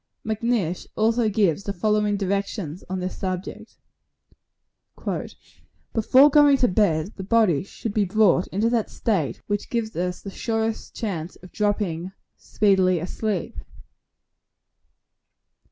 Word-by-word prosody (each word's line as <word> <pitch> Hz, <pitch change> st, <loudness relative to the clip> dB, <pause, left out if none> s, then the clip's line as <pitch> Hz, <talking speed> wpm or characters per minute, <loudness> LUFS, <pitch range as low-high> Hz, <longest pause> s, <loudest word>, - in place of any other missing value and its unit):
Macnish 220 Hz, -5 st, -1 dB
also 225 Hz, +1 st, +2 dB
gives 200 Hz, -4 st, +1 dB
the 200 Hz, -, -3 dB
following 210 Hz, +2 st, +1 dB
directions 195 Hz, -3 st, -3 dB
on 190 Hz, 0 st, -2 dB
this 185 Hz, +1 st, -4 dB
subject: 185 Hz, -1 st, -5 dB, 2.2 s
"Before 260 Hz, +6 st, +5 dB
going 290 Hz, -1 st, +6 dB
to 250 Hz, -, +3 dB
bed, 180 Hz, -2 st, +1 dB
the 190 Hz, -, -5 dB
body 200 Hz, -7 st, +3 dB
should 200 Hz, +2 st, -6 dB
be 210 Hz, -1 st, +2 dB
brought 190 Hz, -2 st, +3 dB
into 210 Hz, +4 st, 0 dB
that 230 Hz, -3 st, 0 dB
state, 165 Hz, -, -1 dB
which 205 Hz, 0 st, -3 dB
gives 230 Hz, -2 st, -2 dB
us 180 Hz, +1 st, -2 dB
the 195 Hz, -, -6 dB
surest 225 Hz, +1 st, -3 dB
chance 180 Hz, -6 st, -4 dB
of 180 Hz, -, -12 dB
dropping 195 Hz, -4 st, -1 dB, 0.2 s
speedily 190 Hz, -3 st, +2 dB
asleep. 185 Hz, +2 st, -3 dB
205 Hz, 120 wpm, -24 LUFS, 185-220 Hz, 2.2 s, going